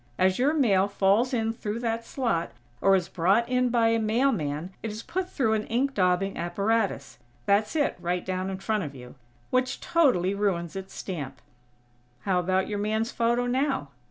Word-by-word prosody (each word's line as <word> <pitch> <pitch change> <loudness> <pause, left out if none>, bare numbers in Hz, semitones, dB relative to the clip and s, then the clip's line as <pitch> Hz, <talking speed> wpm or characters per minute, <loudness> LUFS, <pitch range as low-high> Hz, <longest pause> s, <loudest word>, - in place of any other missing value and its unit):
As 185 +2 +2
your 285 +5 +3
mail 200 -9 +3
falls 200 +5 +2
in 225 -3 0
through 220 -2 -4
that 230 -1 -1
slot, 200 - -2 0.3
or 195 0 +5
is 180 -3 0
brought 195 +7 +2
in 250 0 +1
by 230 -1 +3
a 230 0 +2
mailman 215 - 0
it 225 - -3
is 215 +2 -7
put 370 0 -3
through 230 -10 +1
an 215 -1 -1
ink 265 +4 0
daubing 185 0 +1
apparatus 200 -2 -1 0.3
that's 205 +7 +2
it, 290 -3 +1
right 175 +1 -2
down 185 0 -2
in 190 - -4
front 215 +1 -1
of 145 -2 -7
you 125 -1 -11 0.4
which 255 +1 +1
totally 250 - +2
ruins 190 -5 -1
its 190 0 -7
stamp. 155 -8 -6 0.8
How 190 -2 +1
about 185 +1 +1
your 205 -1 -3
man's 220 +2 -1
photo, 235 +1 +1
now?" 255 - 0
210 Hz, 180 wpm, -27 LUFS, 185-235 Hz, 0.8 s, or